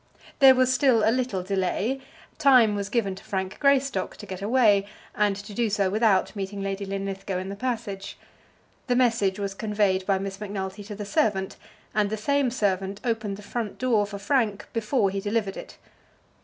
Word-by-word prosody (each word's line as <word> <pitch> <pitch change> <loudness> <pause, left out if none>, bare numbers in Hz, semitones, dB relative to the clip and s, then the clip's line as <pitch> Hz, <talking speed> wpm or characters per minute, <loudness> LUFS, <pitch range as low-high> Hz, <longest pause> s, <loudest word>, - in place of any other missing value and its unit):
There 265 -2 +8
was 255 0 +3
still 255 -6 +3
a - - +5
little 245 -8 -1
delay. 200 +7 -1 0.4
Time 255 -7 +6
was 200 -1 -3
given 210 -3 0
to 190 - -12
Frank 190 -1 -4
Greystock 275 -8 +1
to - - -9
get 190 0 -7
away, 205 -3 +3 0.3
and 205 -1 +1
to 205 +2 -9
do 230 +1 0
so 200 -2 +1
without 200 -2 +2
meeting 200 0 -4
Lady 195 0 -3
Linlithgow 195 -1 -3
in 185 +1 -4
the 200 - -5
passage. 215 -4 -4 0.7
The 245 - +2
message 230 -6 +2
was 200 -1 -3
conveyed 205 -2 0
by 195 -1 +3
Miss 195 0 -5
Macnulty 195 -1 -5
to 210 0 -7
the 205 0 -6
servant, 200 -1 0 0.4
and 210 -1 +1
the 220 - -2
same 280 +4 +1
servant 200 -4 -1
opened 220 -5 -2
the 210 - -11
front 215 0 -4
door 230 -5 +2
for 205 -1 -6
Frank 210 -1 0
before 215 -2 +1
he 195 - -2
delivered 205 -1 -1
it. - - -10
205 Hz, 185 wpm, -25 LUFS, 195-230 Hz, 0.7 s, There